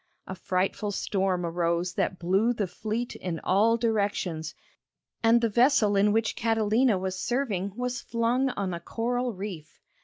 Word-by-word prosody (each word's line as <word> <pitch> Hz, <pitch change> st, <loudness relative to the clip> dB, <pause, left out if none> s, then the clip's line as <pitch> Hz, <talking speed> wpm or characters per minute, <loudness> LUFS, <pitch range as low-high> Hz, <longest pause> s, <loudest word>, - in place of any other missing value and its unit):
A -, -, -6 dB
frightful 185 Hz, +3 st, -1 dB
storm 190 Hz, -3 st, -1 dB
arose 170 Hz, +1 st, -1 dB
that 185 Hz, -, -1 dB
blew 195 Hz, +8 st, +2 dB
the 215 Hz, -4 st, -1 dB
fleet 220 Hz, +6 st, -4 dB
in 170 Hz, -3 st, -4 dB
all 220 Hz, +5 st, +3 dB
directions, 200 Hz, -8 st, -1 dB, 0.7 s
and 230 Hz, +1 st, +4 dB
the 230 Hz, -, +3 dB
vessel 235 Hz, -2 st, +3 dB
in 200 Hz, +1 st, +4 dB
which 225 Hz, 0 st, +1 dB
Catalina 225 Hz, 0 st, +2 dB
was 185 Hz, 0 st, -3 dB
serving 205 Hz, -7 st, -1 dB
was 250 Hz, +1 st, -3 dB
flung 240 Hz, +3 st, 0 dB
on 195 Hz, -6 st, -3 dB
a 170 Hz, -, -4 dB
coral 245 Hz, +7 st, -2 dB
reef. 185 Hz, -7 st, -8 dB
205 Hz, 150 wpm, -27 LUFS, 185-230 Hz, 0.7 s, and